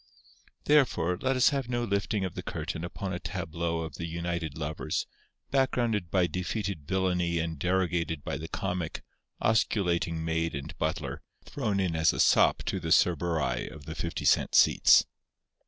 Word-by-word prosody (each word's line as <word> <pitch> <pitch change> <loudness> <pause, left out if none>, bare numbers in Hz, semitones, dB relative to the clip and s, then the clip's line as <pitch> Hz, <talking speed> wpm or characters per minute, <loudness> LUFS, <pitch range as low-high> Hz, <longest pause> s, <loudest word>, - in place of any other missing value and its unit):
Therefore 130 - +3
let 130 0 +1
us 130 +1 +5
have 135 -4 -2
no 120 -1 -1
lifting 100 -2 -1
of 90 - -5
the - - -5
curtain 80 - -5
upon 95 +2 -4
a 90 - -3
tableau 85 +1 -3
of 80 -3 -6
the 85 - -4
united 85 -2 -3
lovers, 80 0 -2 0.5
backgrounded 120 -8 +1
by 90 0 +3
defeated 90 -1 -3
villainy 90 -2 0
and 80 -2 -2
derogated 90 -3 0
by - - -3
the 80 +3 -6
comic, 90 -4 -3 0.4
osculating 90 -6 +1
maid 80 -1 -1
and 70 - -6
butler, - - -2 0.2
thrown 110 -8 -2
in 90 -4 0
as 80 0 +3
a - - -5
sop - - +4
to 95 - -2
the 80 -2 -5
Cerberi 80 -7 +2
of 75 -2 -12
the 80 - -6
fifty 85 +1 -4
cent - - +3
seats. - - +6
85 Hz, 160 wpm, -29 LUFS, 80-100 Hz, 0.5 s, seats